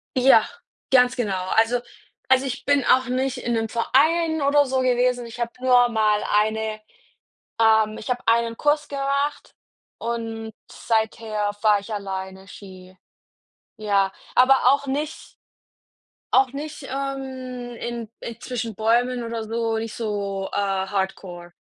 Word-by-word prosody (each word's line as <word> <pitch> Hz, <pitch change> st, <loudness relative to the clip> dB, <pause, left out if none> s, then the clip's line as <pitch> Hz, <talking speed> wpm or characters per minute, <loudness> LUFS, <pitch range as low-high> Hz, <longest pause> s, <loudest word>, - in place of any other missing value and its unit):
Ja, 250 Hz, -4 st, +6 dB, 0.5 s
ganz 250 Hz, -1 st, +5 dB
genau. 210 Hz, -6 st, -1 dB, 0.2 s
Also 230 Hz, +2 st, +3 dB, 0.5 s
also, 260 Hz, +1 st, +5 dB
ich 255 Hz, -2 st, -4 dB
bin 285 Hz, -1 st, +2 dB
auch 255 Hz, 0 st, +4 dB
nicht 255 Hz, +1 st, -1 dB
in 240 Hz, -1 st, -2 dB
'nem 225 Hz, -1 st, -1 dB
Verein 315 Hz, +7 st, +2 dB
oder 285 Hz, +1 st, +4 dB
so 260 Hz, 0 st, 0 dB
gewesen, 250 Hz, -1 st, +1 dB
ich 235 Hz, +1 st, -10 dB
habe 235 Hz, 0 st, -2 dB
nur 245 Hz, -1 st, +5 dB
mal 215 Hz, -2 st, +2 dB, 0.2 s
eine 220 Hz, 0 st, -2 dB, 0.8 s
ähm, 220 Hz, -1 st, +4 dB
ich -, -, -8 dB
habe 250 Hz, 0 st, -1 dB
einen 230 Hz, 0 st, +2 dB
Kurs 295 Hz, 0 st, +1 dB
gemacht 280 Hz, +1 st, -2 dB, 0.5 s
und 225 Hz, -1 st, -4 dB, 0.2 s
seither 220 Hz, -2 st, -1 dB
fahre 210 Hz, -2 st, +4 dB
ich 215 Hz, +2 st, -7 dB
alleine 190 Hz, -1 st, -6 dB
Ski. 185 Hz, -1 st, -13 dB, 0.8 s
Ja, 200 Hz, -3 st, +1 dB, 0.2 s
aber 265 Hz, +1 st, +5 dB
auch 280 Hz, 0 st, 0 dB
nicht 295 Hz, +3 st, -4 dB, 1.0 s
auch 260 Hz, -1 st, +4 dB
nicht, 295 Hz, +1 st, -7 dB
ähm, 260 Hz, -2 st, -5 dB
in 235 Hz, -2 st, -5 dB
in 235 Hz, 0 st, -7 dB
zwischen 235 Hz, -3 st, -4 dB
Bäumen 240 Hz, +3 st, +1 dB
oder 230 Hz, -1 st, -4 dB
so 225 Hz, 0 st, -2 dB
nicht 225 Hz, 0 st, -4 dB
so, 200 Hz, -3 st, -3 dB
äh, -, -, -1 dB
Hardcore. 190 Hz, -3 st, -3 dB
235 Hz, 135 wpm, -23 LUFS, 215-260 Hz, 1.0 s, Ja